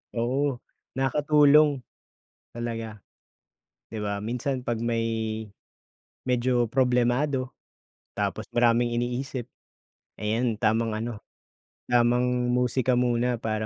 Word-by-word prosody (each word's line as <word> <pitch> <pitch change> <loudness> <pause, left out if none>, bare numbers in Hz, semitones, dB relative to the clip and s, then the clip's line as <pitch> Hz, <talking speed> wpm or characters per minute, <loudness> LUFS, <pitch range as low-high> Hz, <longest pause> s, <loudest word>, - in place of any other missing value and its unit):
Oo, 130 +4 0 0.4
nakakatulong. 145 +1 +4 0.7
Talaga. 115 -2 -5 0.9
Di 110 - -5
'ba, 100 -1 -2
minsan 125 +3 -2
'pag 120 -2 -2
may 115 0 0 1.2
medyo 125 -1 +2
problemado, 130 +2 +1 0.6
tapos - - -2
maraming 120 0 +3
iniisip, 125 +1 -3 0.7
ayan, 110 +2 0
tamang 115 +1 +1
ano, 115 +2 -3 0.8
tamang 125 +1 +2
musika 125 +1 +1
muna 120 -1 +1
para 110 -1 -2
120 Hz, 90 wpm, -26 LUFS, 115-130 Hz, 1.2 s, nakakatulong